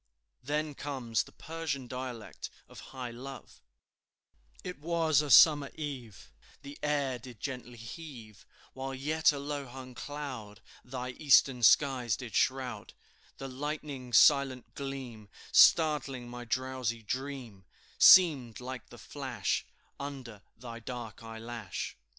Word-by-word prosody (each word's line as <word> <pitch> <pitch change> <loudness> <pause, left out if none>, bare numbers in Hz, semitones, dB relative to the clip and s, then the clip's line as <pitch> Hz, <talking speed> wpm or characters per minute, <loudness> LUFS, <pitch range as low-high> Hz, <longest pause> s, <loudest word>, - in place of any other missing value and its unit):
Then 150 +3 -2
comes 130 -6 -2
the - - -10
Persian 155 -5 -5
dialect 125 -3 -6 0.2
of - - -13
high 130 -2 -6
love: 130 +3 -10 1.0
"It 180 -3 -6
was 160 -2 +2
a 150 - -4
summer 145 0 +7
eve, 130 - -7 0.3
The 140 +1 -10
air 140 -4 0
did 120 -2 -12
gently 125 -2 -6
heave, 115 - -10 0.3
While 135 +1 -5
yet 155 +4 +2
a 145 - -5
low 140 0 -4
hung 130 0 -10
cloud 130 -8 -7 0.2
Thy 125 0 -5
eastern 135 -2 +4
skies 125 -2 +4
did 125 -4 -8
shroud; 125 -5 -1 0.4
The 135 - -6
lightning's 135 -3 -2
silent 135 -4 +4
gleam 130 -6 -7 0.2
Startling 145 -6 +5
my 120 0 -8
drowsy 125 -2 -2
dream, 125 -5 -5 0.3
Seemed 145 - +7
like 125 -1 -7
the - - -12
flash - - -3 0.3
Under 130 -7 -7 0.2
thy 115 0 -8
dark 120 -2 -7
eyelash. 115 -3 -6
130 Hz, 120 wpm, -31 LUFS, 120-145 Hz, 1.0 s, summer